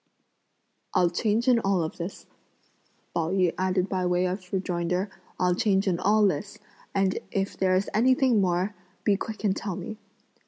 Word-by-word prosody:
"I'll 175 -1 +4
change 220 +6 0
in 245 -2 +5
all 195 -6 +1
this," 170 +4 -7 0.9
Pao 165 -1 0
yü 185 -2 +2
added 185 0 0
by 185 -2 -1
way 180 +1 +2
of 185 0 -4
rejoinder; 180 0 -1 0.3
"I'll 180 -1 +3
change 195 -1 +1
in 175 -2 +1
all 210 +2 +4
this; 200 +1 -1 0.4
and 195 -1 +2
if 195 0 -2
there's 185 +1 +2
anything 255 -1 +4
more 185 +2 +1 0.3
be 205 - +3
quick 220 +2 -6
and 195 -3 +2
tell 200 -3 -4
me." 195 +4 -7
190 Hz, 155 wpm, -27 LUFS, 180-205 Hz, 0.9 s, in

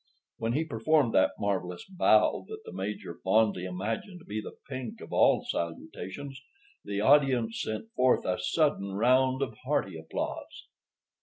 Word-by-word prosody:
When 115 +1 -1
he 150 +5 +1
performed 135 0 +2
that 95 - +4
marvelous 95 -3 -2
bow 190 0 +3
that 435 0 -8
the 455 - -9
Major 105 -5 -5
fondly 100 -2 +2
imagined 105 - -4
to - - -16
be 110 +1 -4
the - - -10
pink 130 -4 -6
of - - -10
all - - +4
salutations, 95 - -5 0.4
the 100 0 -2
audience 130 -3 +3
sent 110 +1 -4
forth 125 +1 +3
a 90 0 0
sudden 100 - +1
round 130 +5 +3
of 115 -5 -5
hearty 95 - -1
applause. 80 0 -5
115 Hz, 150 wpm, -29 LUFS, 95-135 Hz, 0.4 s, that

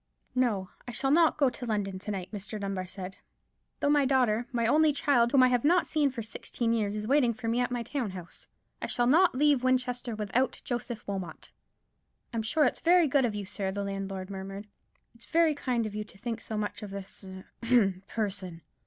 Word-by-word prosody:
"No, 225 -7 +1 0.2
I - - -4
shall 270 +3 0
not 325 +1 +4
go 275 -4 +3
to 245 - -7
London 200 -3 -2
to 200 - -7
night," 190 -3 -4
Mr. 210 +1 -6
Dunbar 195 -2 -3
said; 190 0 -7 0.6
"though 285 - +2
my 290 -1 +4
daughter, 250 -3 +2
my 235 -2 0
only 305 +5 +4
child, 245 -5 +3
whom 270 -2 +6
I 255 - +6
have 245 -1 +1
not 345 +4 +4
seen 300 -3 +2
for 245 -3 -5
sixteen 230 +1 -2
years, 210 -3 0
is 210 0 -3
waiting 255 -4 +3
for 230 0 -6
me 230 +2 +1
at 245 - +1
my 245 -1 -2
town 240 -2 -3
house. 180 -2 -10 0.3
I - - -2
shall 240 - +1
not 325 +5 +5
leave 285 -2 +3
Winchester 250 -2 0
without 215 +5 0
Joseph 240 -2 -4
Wilmot." 195 -3 -5 0.8
"I'm 230 - 0
sure 295 +8 +2
it's 250 - 0
very 345 -1 +5
good 275 -1 +3
of 220 -3 -1
you, 205 -1 -4
sir," 195 0 -3
the 200 +1 -3
landlord 195 -1 -4
murmured; 195 +1 -6 0.5
"it's 230 0 -10
very 330 -1 +3
kind 250 -5 -1
of 215 - -5
you 210 0 -3
to 210 - -18
think 230 +1 -4
so 220 - -4
much 210 +1 -3
of 210 - -6
this—ahem—person." 195 -1 -2
230 Hz, 205 wpm, -29 LUFS, 200-255 Hz, 0.8 s, whom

